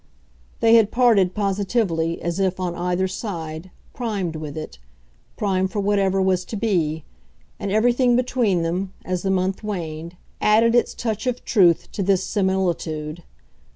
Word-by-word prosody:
They 225 Hz, 0 st, +5 dB
had 220 Hz, -3 st, +4 dB
parted, 220 Hz, -7 st, +3 dB
positively, 195 Hz, -4 st, 0 dB
as 170 Hz, +2 st, -2 dB
if, 190 Hz, -1 st, 0 dB
on 180 Hz, -2 st, -2 dB
either 180 Hz, +2 st, -1 dB
side, 170 Hz, -4 st, -6 dB, 0.2 s
primed 200 Hz, -9 st, -3 dB
with 155 Hz, -1 st, -6 dB
it 155 Hz, -, -7 dB, 0.6 s
primed 190 Hz, -2 st, 0 dB
for 210 Hz, -, -2 dB
whatever 195 Hz, -1 st, +1 dB
was 190 Hz, -1 st, +2 dB
to 220 Hz, -, -6 dB
be; 170 Hz, -8 st, 0 dB, 0.6 s
and 200 Hz, -, -3 dB
everything 240 Hz, +3 st, +3 dB
between 240 Hz, -8 st, +1 dB
them, 185 Hz, +3 st, -2 dB
as 185 Hz, -1 st, -2 dB
the 195 Hz, -, -2 dB
month 190 Hz, +1 st, 0 dB
waned, 170 Hz, -4 st, -5 dB, 0.2 s
added 225 Hz, +2 st, +4 dB
its 240 Hz, -, +2 dB
touch 220 Hz, +1 st, -3 dB
of 250 Hz, -1 st, -2 dB
truth 180 Hz, -7 st, +4 dB
to 205 Hz, -, -4 dB
this 190 Hz, -1 st, +2 dB
similitude. 175 Hz, -6 st, -1 dB
190 Hz, 150 wpm, -22 LUFS, 175-215 Hz, 0.6 s, They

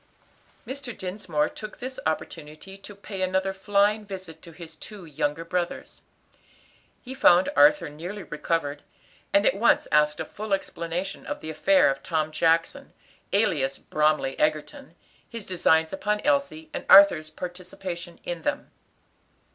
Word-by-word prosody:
Mr. 260 Hz, -3 st, -7 dB
Dinsmore 180 Hz, -5 st, -2 dB
took 215 Hz, -1 st, -9 dB
this 260 Hz, +1 st, -6 dB
opportunity 160 Hz, +3 st, -5 dB
to 195 Hz, +1 st, -12 dB
pay 200 Hz, -1 st, -7 dB
another 190 Hz, +1 st, 0 dB
flying 205 Hz, +2 st, +1 dB
visit 185 Hz, -5 st, -9 dB
to 170 Hz, -, -12 dB
his 165 Hz, -1 st, -11 dB
two 195 Hz, +3 st, -11 dB
young 150 Hz, -1 st, -2 dB
brothers. 170 Hz, +2 st, -4 dB, 1.0 s
He 260 Hz, -, -7 dB
found 185 Hz, -5 st, +5 dB
Arthur 295 Hz, +1 st, +5 dB
nearly 175 Hz, +7 st, -7 dB
recovered, 150 Hz, -2 st, -2 dB, 0.5 s
and 200 Hz, +1 st, +3 dB
at -, -, +4 dB
once 225 Hz, +4 st, +3 dB
asked 150 Hz, 0 st, +3 dB
a -, -, -3 dB
full 215 Hz, -1 st, -5 dB
explanation 175 Hz, -1 st, -5 dB
of -, -, -4 dB
the 160 Hz, -, -6 dB
affair 185 Hz, +5 st, +4 dB
of 135 Hz, -, -6 dB
Tom 155 Hz, -1 st, -1 dB
Jackson, 165 Hz, +1 st, 0 dB, 0.4 s
alias 145 Hz, -10 st, +1 dB
Bromly 150 Hz, -3 st, 0 dB
Egerton; 155 Hz, -, -2 dB, 0.3 s
his 230 Hz, -4 st, -7 dB
designs 160 Hz, -3 st, +2 dB
upon 210 Hz, +2 st, -1 dB
Elsie, 280 Hz, -, 0 dB
and -, -, -4 dB
Arthur's 195 Hz, -6 st, +7 dB
participation 175 Hz, 0 st, -7 dB
in 175 Hz, -1 st, -5 dB
them. -, -, -3 dB
175 Hz, 140 wpm, -25 LUFS, 155-200 Hz, 1.0 s, Arthur's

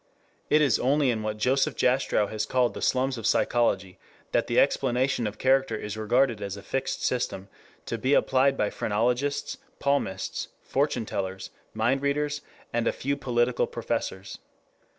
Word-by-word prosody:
It 155 Hz, 0 st, +5 dB
is 135 Hz, -6 st, +3 dB
only 140 Hz, +1 st, +3 dB
in 110 Hz, -2 st, -2 dB
what 110 Hz, 0 st, -3 dB
Joseph 130 Hz, +5 st, +1 dB
Jastrow 125 Hz, -4 st, +2 dB
has 110 Hz, +1 st, -3 dB
called 125 Hz, 0 st, +2 dB
the -, -, -7 dB
slums 130 Hz, -1 st, +1 dB
of 110 Hz, -, -1 dB
psychology 100 Hz, -7 st, +1 dB, 0.3 s
that -, -, +1 dB
the -, -, +3 dB
explanation 125 Hz, -1 st, +1 dB
of 105 Hz, 0 st, -6 dB
character 130 Hz, -2 st, +2 dB
is 105 Hz, -1 st, -5 dB
regarded 115 Hz, +1 st, +1 dB
as 100 Hz, 0 st, -4 dB
a 100 Hz, -, -10 dB
fixed 135 Hz, +5 st, -2 dB
system 100 Hz, -6 st, -2 dB, 0.4 s
to -, -, -3 dB
be 135 Hz, +2 st, +3 dB
applied 135 Hz, +1 st, +3 dB
by 105 Hz, -, 0 dB
phrenologists, 125 Hz, +7 st, -1 dB, 0.2 s
palmists, 140 Hz, -10 st, -1 dB, 0.2 s
fortune 135 Hz, -4 st, 0 dB
tellers, 95 Hz, -2 st, -4 dB, 0.2 s
mind 120 Hz, +5 st, +1 dB
readers, 145 Hz, +1 st, -1 dB, 0.3 s
and 120 Hz, 0 st, 0 dB
a -, -, +3 dB
few 140 Hz, +2 st, -2 dB
political 120 Hz, -2 st, +1 dB
professors. 95 Hz, +1 st, -4 dB
125 Hz, 155 wpm, -27 LUFS, 105-135 Hz, 0.4 s, It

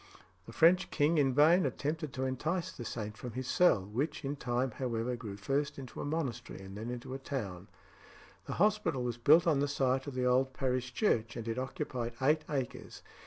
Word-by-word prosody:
The -, -, -8 dB
French 170 Hz, +8 st, +4 dB
king 155 Hz, +2 st, +2 dB
in 135 Hz, -2 st, +3 dB
vain 155 Hz, +7 st, +5 dB
attempted 155 Hz, 0 st, -2 dB
to 130 Hz, -, -3 dB
entice 155 Hz, +7 st, -1 dB
the 120 Hz, -, -8 dB
saint 110 Hz, -2 st, -5 dB
from 125 Hz, 0 st, -7 dB
his 130 Hz, 0 st, -4 dB
cell, 125 Hz, -, +4 dB
which 130 Hz, +9 st, -3 dB
in 140 Hz, +2 st, -2 dB
time, 125 Hz, -1 st, -1 dB
however, 120 Hz, 0 st, -2 dB
grew 110 Hz, -5 st, -7 dB
first 140 Hz, +8 st, -1 dB
into 130 Hz, -3 st, -7 dB
a -, -, -3 dB
monastery, 135 Hz, -8 st, -3 dB
and 95 Hz, 0 st, -9 dB
then 110 Hz, +3 st, -5 dB
into 125 Hz, +1 st, -6 dB
a 135 Hz, -, -4 dB
town. 100 Hz, -10 st, -5 dB, 0.8 s
This -, -, -3 dB
hospital 190 Hz, -9 st, +2 dB
was 120 Hz, -1 st, -2 dB
built 155 Hz, +8 st, +6 dB
on 155 Hz, -5 st, +3 dB
the 145 Hz, -, +2 dB
site 135 Hz, -1 st, 0 dB
of 140 Hz, -, -5 dB
the 125 Hz, 0 st, 0 dB
old 130 Hz, +1 st, +3 dB
parish 125 Hz, -1 st, -1 dB
church, 120 Hz, -, +1 dB
and 115 Hz, -1 st, -5 dB
it 115 Hz, +2 st, -2 dB
occupied 130 Hz, -4 st, -3 dB
eight 150 Hz, +4 st, +3 dB
acres. 135 Hz, -5 st, -4 dB
130 Hz, 200 wpm, -32 LUFS, 120-150 Hz, 0.8 s, built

